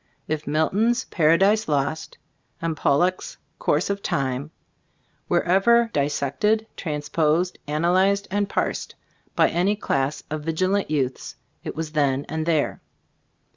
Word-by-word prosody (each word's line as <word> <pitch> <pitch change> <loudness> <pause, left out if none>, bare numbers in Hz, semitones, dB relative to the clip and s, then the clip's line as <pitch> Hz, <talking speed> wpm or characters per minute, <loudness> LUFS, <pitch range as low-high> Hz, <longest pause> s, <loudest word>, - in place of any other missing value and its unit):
If 155 0 -3
Milton's 200 +11 +1
"Paradise 195 +7 +3
Lost," 155 +2 -2 0.4
and 165 -1 -2
Pollok's 175 +6 +1 0.2
"Course 150 +5 +1
of 200 0 -3
Time" 135 -1 -2 0.8
were - - +2
ever 230 +6 +3
dissected, 145 +10 0
transposed, 155 +2 -1
ana 155 +3 0
lyzed 195 +2 +3
and 205 0 0
"parsed" - - -2 0.4
by - - +4
any 185 +5 +1
class 140 -8 -1
of 155 0 -3
vigilant 185 +5 0
youths, 135 -4 -2 0.3
it - - -5
was 160 0 -4
then 140 -2 +1
and 160 +1 -3
there. 155 -4 0
160 Hz, 125 wpm, -23 LUFS, 150-195 Hz, 0.8 s, by